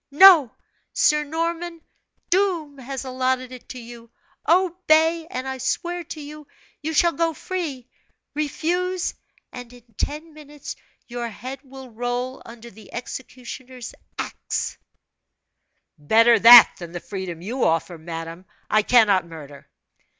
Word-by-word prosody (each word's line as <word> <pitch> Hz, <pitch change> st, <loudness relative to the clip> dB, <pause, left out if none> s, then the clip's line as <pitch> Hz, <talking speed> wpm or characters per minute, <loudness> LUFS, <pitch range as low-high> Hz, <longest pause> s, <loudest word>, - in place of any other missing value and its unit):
No, 315 Hz, -3 st, +8 dB, 0.4 s
Sir 300 Hz, 0 st, +3 dB
Norman, 335 Hz, +2 st, -3 dB, 0.5 s
Doom 345 Hz, -7 st, 0 dB
has 265 Hz, +1 st, -6 dB
allotted 255 Hz, 0 st, -1 dB
it 255 Hz, -1 st, -12 dB
to 255 Hz, -, -7 dB
you 235 Hz, 0 st, -12 dB, 0.4 s
obey, 335 Hz, -2 st, +3 dB
and 255 Hz, +1 st, -5 dB
I 265 Hz, 0 st, -4 dB
swear 345 Hz, +7 st, -2 dB
to 310 Hz, -, -8 dB
you, 300 Hz, 0 st, -10 dB, 0.3 s
you 310 Hz, +2 st, -3 dB
shall 340 Hz, +2 st, +3 dB
go 330 Hz, -1 st, -1 dB
free; 300 Hz, -11 st, -5 dB, 0.5 s
refuse 345 Hz, +5 st, -1 dB, 0.4 s
and 245 Hz, -1 st, -9 dB
in 245 Hz, -1 st, -16 dB, 0.2 s
ten 305 Hz, +2 st, -4 dB
minutes 295 Hz, -1 st, -9 dB, 0.3 s
your 240 Hz, -1 st, -5 dB
head 255 Hz, +5 st, -8 dB
will 265 Hz, -2 st, -12 dB
roll 245 Hz, +3 st, -3 dB
under 235 Hz, 0 st, -12 dB
the 215 Hz, +1 st, -16 dB
executioner's 250 Hz, 0 st, -8 dB, 0.2 s
axe!" -, -, -4 dB, 1.2 s
"Better 225 Hz, +9 st, +5 dB
that 235 Hz, +2 st, +10 dB
than 170 Hz, -1 st, -9 dB
the 175 Hz, -, -4 dB
freedom 180 Hz, -3 st, -6 dB
you 245 Hz, +7 st, -2 dB
offer! 165 Hz, +1 st, 0 dB
Madame, 165 Hz, +2 st, -7 dB, 0.3 s
I 215 Hz, -, +5 dB
cannot 205 Hz, -6 st, +4 dB
murder!" 145 Hz, -4 st, -12 dB
260 Hz, 130 wpm, -23 LUFS, 230-315 Hz, 1.2 s, that